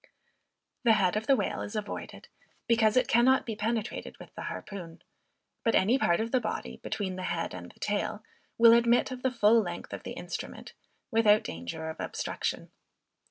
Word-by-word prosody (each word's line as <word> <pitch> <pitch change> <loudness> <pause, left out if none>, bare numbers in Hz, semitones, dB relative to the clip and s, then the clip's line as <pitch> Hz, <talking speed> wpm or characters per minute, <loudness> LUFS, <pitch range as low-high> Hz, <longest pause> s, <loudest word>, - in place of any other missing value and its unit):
The 230 -2 +6
head 195 -3 +2
of 215 +1 -2
the 275 - +6
whale 205 -6 -2
is 205 - -6
avoided, 210 -1 -6 0.4
because 225 -1 +3
it 255 -1 +4
cannot 260 +1 +4
be 225 - -4
penetrated 220 +1 -3
with - - -13
the - - -8
harpoon; 175 -4 -8 0.6
but 230 - +2
any 230 +8 +3
part 170 -10 +2
of 225 +1 -2
the 255 - +3
body, 220 - -4
between 190 -3 -4
the - - -4
head 170 -2 -2
and 90 -1 -8
the - - -25
tail, 210 +1 -2 0.3
will 230 0 +8
admit 235 +2 +4
of 255 -1 -6
the 260 - +2
full 225 -2 +4
length - - -6
of - - -5
the - - -7
instrument, - - -7 0.4
without 215 -2 +5
danger 85 - -6
of 160 - -12
obstruction. - - -3
215 Hz, 180 wpm, -29 LUFS, 190-235 Hz, 0.6 s, will